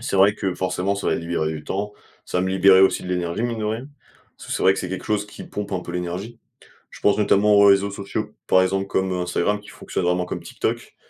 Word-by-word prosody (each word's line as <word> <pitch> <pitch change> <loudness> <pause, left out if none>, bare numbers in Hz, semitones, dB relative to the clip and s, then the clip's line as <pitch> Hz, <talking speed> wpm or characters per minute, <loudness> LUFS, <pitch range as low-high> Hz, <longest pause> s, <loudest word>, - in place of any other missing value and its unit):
C'est 120 - -2
vrai 100 +2 +5
que 95 -3 -2
forcément, 95 +1 -1
ça 100 - -4
m'a - - +2
libéré 85 -2 -2
du 75 -1 -6
temps. 105 +2 -3 0.3
Ça 90 - -1
me 95 - 0
libérait 95 0 +6
aussi 95 - +4
de - - -6
l'énergie, 90 +3 -2
mine 120 -2 -2
de - - -2
rien. 110 +5 -3 0.5
Parce - - -13
que - - -3
c'est - - -2
vrai 95 - +7
que, - - -5
c'est 90 - -4
quelque 95 +1 -5
chose 105 -1 0
qui 105 - -10
pompe 105 0 -6
un 90 - -1
peu 85 - -8
l'énergie. 90 +6 -5 0.5
Je - - -13
pense 105 +1 +3
notamment 105 0 +4
aux 100 0 +7
réseaux 100 0 +4
sociaux, 105 +2 -5
par 95 - +5
exemple, 95 +1 0
comme 95 -1 0
Instagram 90 +3 0
qui 105 - -17
fonctionne 90 - -4
vraiment 90 0 +1
comme - - -5
TikTok. - - -4
95 Hz, 250 wpm, -22 LUFS, 90-105 Hz, 0.5 s, vrai